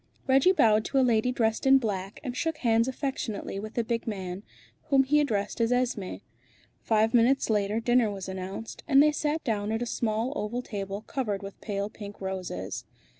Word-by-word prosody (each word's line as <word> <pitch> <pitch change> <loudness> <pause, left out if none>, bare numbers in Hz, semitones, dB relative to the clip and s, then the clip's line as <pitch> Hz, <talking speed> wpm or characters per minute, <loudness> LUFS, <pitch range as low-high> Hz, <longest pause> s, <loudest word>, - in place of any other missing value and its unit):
Reggie 270 +7 +5
bowed 220 - +4
to 275 - -1
a 265 - +5
lady 235 0 +2
dressed 225 0 0
in 270 0 +8
black, 200 -5 -3
and 250 -3 -4
shook 320 +3 -1
hands 230 -2 +2
affectionately 260 -7 -3
with 215 +2 -7
the 235 - +1
big 230 +1 -2
man, 190 -3 -4 0.4
whom 270 -2 +4
he 295 +3 +3
addressed 215 -6 -1
as 230 +1 +2
Esmé. 235 - -1 0.6
Five 220 0 +2
minutes 245 +1 +3
later 210 +1 +1
dinner 240 -1 +3
was 195 -2 -6
announced, 190 +3 -6
and 275 -2 +6
they 300 - +4
sat 300 +1 -1
down 215 -5 -1
at 225 +2 -1
a - - -2
small 230 +2 -1
oval 220 +4 -3
table 200 -2 -5
covered 215 -6 -3
with 195 0 -9
pale 200 -1 -2
pink 205 -1 -10
roses. 185 - -4
225 Hz, 185 wpm, -28 LUFS, 200-255 Hz, 0.6 s, in